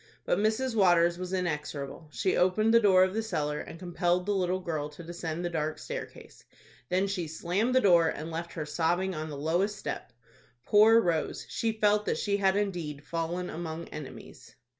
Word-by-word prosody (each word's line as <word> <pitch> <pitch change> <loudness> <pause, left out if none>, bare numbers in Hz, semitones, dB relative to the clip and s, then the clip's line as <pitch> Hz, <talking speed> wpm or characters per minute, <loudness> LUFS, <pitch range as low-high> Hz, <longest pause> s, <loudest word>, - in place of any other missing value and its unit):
But - - +1
Mrs. 220 +4 +1
Waters 175 -3 +4
was 185 0 -5
inexorable. 155 -4 -3
She 190 +3 0
opened 215 +5 +3
the 230 - +8
door 190 -4 +5
of 185 0 0
the 225 - 0
cellar, 150 -9 -2
and - - -8
compelled 175 0 0
the 205 - 0
little 185 -1 0
girl 155 -5 -3
to 150 +3 -11
descend 170 0 -5
the - - 0
dark 155 -1 -2
staircase. - - -8 0.5
Then 185 +2 +2
she 190 -4 -2
slammed 185 +10 -1
the 260 - +5
door, 175 -5 +5
and 160 +2 -5
left 170 +1 -5
her 155 - -4
sobbing 175 +5 0
on 155 -1 -5
the 145 - -6
lowest 175 +8 0
step. 195 - -5 0.5
Poor 220 +2 +6
Rose! 170 -6 -1
She 225 - -1
felt 210 -1 +2
that - - +1
she 200 -1 0
had 195 -1 +2
indeed 175 -8 -2
fallen 170 +2 -3
among 165 0 -6
enemies. 150 -3 -10
175 Hz, 185 wpm, -29 LUFS, 160-200 Hz, 0.5 s, the